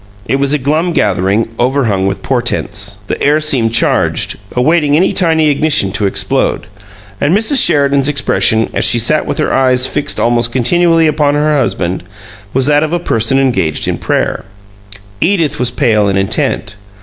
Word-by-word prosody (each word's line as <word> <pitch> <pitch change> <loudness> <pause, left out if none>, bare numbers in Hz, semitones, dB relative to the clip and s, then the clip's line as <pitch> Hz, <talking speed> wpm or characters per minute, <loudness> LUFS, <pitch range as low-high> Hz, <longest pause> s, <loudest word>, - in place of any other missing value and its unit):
It 135 - 0
was 140 0 0
a 150 - +3
glum 155 +6 -1
gathering, 100 - 0
overhung 120 -7 0
with 95 - -4
portents. 105 -5 -2
The - - -5
air 150 +2 +2
seemed 125 -7 0
charged, - - +1 0.2
awaiting 145 +3 +2
any 180 +5 +2
tiny 160 -4 +1
ignition 145 -9 +1
to 100 +1 -1
explode; - - -1 0.6
and 160 +7 +2
Mrs. 245 +5 +3
Sheridan's 140 -3 +2
expression, 115 -5 +1
as - - -1
she 120 - +3
sat 120 +7 +1
with - - -3
her - - -1
eyes 130 -1 +2
fixed 145 +2 -2
almost 120 0 +1
continually 165 +6 +2
upon 150 -2 +1
her 150 +1 +1
husband, 95 -9 -1 0.5
was 130 0 +1
that 145 +1 +3
of 155 +1 -2
a - - +2
person 125 -6 -1
engaged 95 - 0
in - - -2
prayer. - - -2 0.8
Edith 165 -5 0
was 125 - 0
pale 115 -5 +1
and 95 - 0
intent. 95 +1 -2
135 Hz, 165 wpm, -12 LUFS, 115-155 Hz, 0.8 s, a